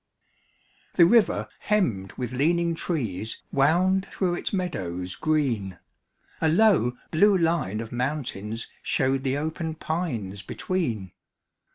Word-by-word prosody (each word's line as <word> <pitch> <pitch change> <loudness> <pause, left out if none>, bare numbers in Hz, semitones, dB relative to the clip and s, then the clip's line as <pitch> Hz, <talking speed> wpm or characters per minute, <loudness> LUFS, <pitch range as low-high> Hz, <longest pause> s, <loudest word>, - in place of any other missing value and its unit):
The 170 - +7
river 230 +4 +4
hemmed 120 - 0
with 125 -1 -4
leaning 170 +5 +2
trees 115 - -3
Wound 180 +7 +3
through 180 -3 0
its 175 - -3
meadows 90 - -3
green; 120 - 0 0.6
A 160 - +3
low, 160 - +4
blue 200 +5 +5
line 165 - 0
of 115 - -8
mountains 120 -4 -3
showed 135 0 +1
The 135 0 0
open 160 +1 -3
pines 125 - -3
between. 115 - -3
145 Hz, 110 wpm, -26 LUFS, 110-170 Hz, 0.6 s, The